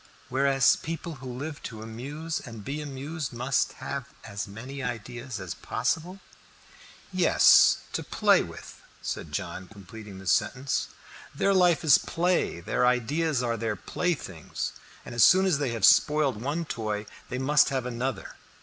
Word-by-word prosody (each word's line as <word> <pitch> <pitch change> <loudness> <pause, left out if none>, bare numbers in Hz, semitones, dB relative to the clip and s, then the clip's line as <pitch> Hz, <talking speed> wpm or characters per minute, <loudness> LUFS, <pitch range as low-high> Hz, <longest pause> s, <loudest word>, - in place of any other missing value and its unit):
"Whereas 135 0 +4
people 165 -2 -6
who 130 -1 -6
live 145 +4 -6
to 110 -2 -7
amuse 140 +8 -5
and 115 -5 -10
be 145 +3 -3
amused 145 +1 -5
must 125 +2 0
have 140 -2 -5 0.2
as 100 -1 -5
many 130 +7 -8
ideas 120 0 -5
as 95 -2 -5
possible." 160 +10 -2 0.9
"Yes, - - +6
to - - -1
play - - +3
with," - - -10 0.2
said - - -4
John, 95 - -4
completing 105 0 -11
the 95 - -11
sentence. 115 +9 +1 0.5
"Their 200 - +2
life 180 -3 +4
is 150 -4 +7
play, 175 - 0
their 90 - 0
ideas 125 +3 +1
are 115 -1 -1
their 110 -1 -2
playthings, 120 - -3 0.3
and - - -8
so 120 - -5 0.2
soon 190 - +2
as 175 -7 +2
they 140 -3 0
have 110 -4 +2
spoiled 150 -7 +4
one 150 +6 -2
toy 110 -6 -3 0.2
they 125 - -3
must 140 +3 +4
have 130 -2 -2
another. 125 +2 -4
130 Hz, 150 wpm, -27 LUFS, 115-150 Hz, 0.9 s, is